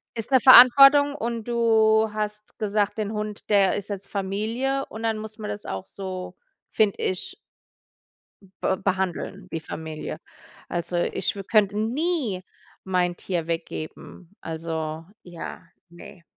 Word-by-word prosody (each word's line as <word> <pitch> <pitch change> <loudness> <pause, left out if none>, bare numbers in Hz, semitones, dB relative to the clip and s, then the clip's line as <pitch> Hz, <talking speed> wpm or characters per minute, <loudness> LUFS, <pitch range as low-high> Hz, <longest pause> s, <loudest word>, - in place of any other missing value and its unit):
ist 225 +4 -5
'ne 260 - +6
Verantwortung 275 +3 +8
und 235 -4 -3
du 220 -2 +3
hast 210 0 -5
gesagt: 210 0 0
„Den 215 0 -2
Hund, 210 -1 -5
der 200 -2 +4
ist 205 +1 -5
jetzt 200 -1 -6
Familie”, 220 +8 -2
und 220 +1 -8
dann 225 -1 0
muss 215 0 -8
man 210 - -5
das 205 - -7
auch 95 0 -5
so, 185 -2 -7 0.4
finde 210 -2 +2
ich 185 - -3 1.3
be 190 - +2
behandeln 190 0 -2
wie 165 - -2
Familie. 155 0 -7 0.5
Also, 175 +1 -3
ich 175 - -1
w 195 - -6
könnte 210 -1 +2
nie 240 - -1 0.4
mein 180 -2 0
Tier 175 -4 -3
weggeben. 165 +2 -6
Also, 160 -1 -4 0.2
ja, 175 -2 -8 0.3
ne. 175 +1 -13
205 Hz, 135 wpm, -24 LUFS, 180-220 Hz, 1.3 s, Verantwortung